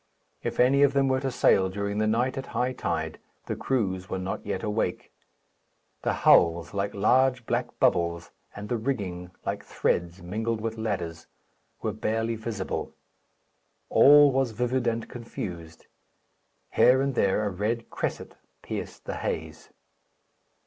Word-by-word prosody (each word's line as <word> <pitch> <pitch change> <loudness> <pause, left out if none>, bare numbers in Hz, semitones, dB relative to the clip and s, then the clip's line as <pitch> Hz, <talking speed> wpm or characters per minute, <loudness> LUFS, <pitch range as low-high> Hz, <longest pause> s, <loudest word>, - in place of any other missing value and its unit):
If - - -4
any 135 +3 +5
of 140 -1 +5
them 140 -1 +3
were 130 0 +2
to 135 0 -2
sail 95 -6 +3
during 100 +2 -3
the 110 - +2
night 120 +5 +1
at 135 -1 -5
high 125 +1 +1
tide, 80 -7 -3 0.3
the - - -3
crews 95 -8 -1
were - - -2
not 95 +1 -4
yet - - -3
awake. 105 +1 -2 0.9
The - - 0
hulls, 85 +1 +5
like 100 0 -2
large 125 +4 +3
black - - 0
bubbles, 85 -1 +1 0.2
and 105 0 -7
the 120 - -1
rigging, 100 -8 -3 0.2
like - - -3
threads 85 +1 -1
mingled 110 +5 -2
with 115 +1 -3
ladders, 85 -7 -3 0.6
were - - -1
barely 115 +1 -1
visible. 110 -3 -4 0.9
All 145 0 +7
was 130 -4 -1
livid 125 0 0
and 115 -1 -1
confused. 85 -9 -7 0.9
Here 130 +1 +5
and 135 0 0
there 105 -2 +2
a 100 - -1
red 110 +5 -2
cresset - - -4 0.3
pierced - - -6
the - - -4
haze. 80 -1 -4
110 Hz, 145 wpm, -27 LUFS, 95-125 Hz, 0.9 s, All